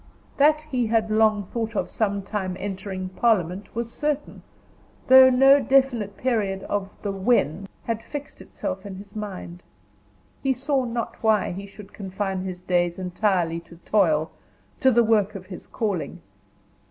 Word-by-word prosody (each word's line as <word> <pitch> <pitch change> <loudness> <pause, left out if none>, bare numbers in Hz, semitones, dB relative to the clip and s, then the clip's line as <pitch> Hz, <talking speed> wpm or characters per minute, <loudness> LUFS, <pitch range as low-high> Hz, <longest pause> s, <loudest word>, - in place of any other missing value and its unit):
That 300 +2 +4
he 255 -6 -1
had 220 -1 +1
long 215 -1 +3
thought 230 -1 -3
of - - -2
some 200 -3 -1
time 190 -2 -3
entering 190 -1 -5
parliament 190 -2 0
was 235 0 -3
certain, 295 -1 -3 0.7
though 260 0 +9
no 270 +2 +6
definite 260 -7 +2
period 205 -6 -1
of 200 -1 -2
the 205 - -1
"when" 195 - +1 0.2
had 225 -1 -2
fixed 290 +2 -8
itself - - -5
in 200 -2 -7
his 200 +2 -12
mind. 185 -4 -6 0.8
He 270 -1 +2
saw 265 +1 0
not 235 -1 -4
why 220 -2 +2
he 195 +3 -7
should 205 0 -13
confine 195 -1 -3
his 180 -1 -6
days 175 -1 0
entirely 180 -2 0
to 170 0 -16
toil, 160 -7 +2 0.5
to 265 - +5
the 240 -1 +4
work 215 -2 +2
of 190 -2 -7
his 185 -1 -10
calling. 205 -7 -3
210 Hz, 155 wpm, -24 LUFS, 190-235 Hz, 0.8 s, though